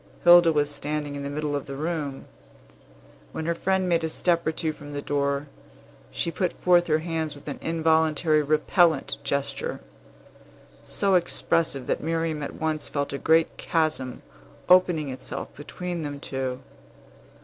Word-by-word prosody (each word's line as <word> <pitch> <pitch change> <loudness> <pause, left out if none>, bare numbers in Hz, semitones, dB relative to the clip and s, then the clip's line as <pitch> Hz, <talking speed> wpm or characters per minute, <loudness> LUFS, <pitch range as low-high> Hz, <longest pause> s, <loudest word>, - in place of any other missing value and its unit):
Hilda 175 -1 +8
was 145 -1 +1
standing 145 0 -3
in 140 - -5
the 140 - -4
middle 150 0 -2
of 140 - -4
the 140 - -6
room. 150 -2 -3 1.1
When 160 - -4
her 170 - +1
friend 190 +2 0
made 170 -2 +2
a 160 - -1
step 170 0 +1
or - - +3
two 160 -1 -2
from 145 -1 -11
the 145 - -3
door, 140 0 -1 0.6
she 170 - -2
put 180 0 -1
forth 175 -1 +3
her 155 -1 +3
hands 160 -3 -2
with 145 +1 -15
an 145 - -5
involuntary 160 -1 +2
repellent 155 +1 +2
gesture, 140 - -2 1.0
so 200 -1 0
expressive 165 -5 +1
that - - -1
Miriam 165 -1 -1
at 140 - -5
once 155 -2 -2
felt 140 -1 -2
a 140 - -3
great 160 0 +3
chasm 155 -6 -1 0.4
opening 180 -5 +4
itself 130 - -6
between 175 +4 -5
them 145 -2 -5
two. 130 -2 -4
155 Hz, 155 wpm, -25 LUFS, 145-170 Hz, 1.1 s, Hilda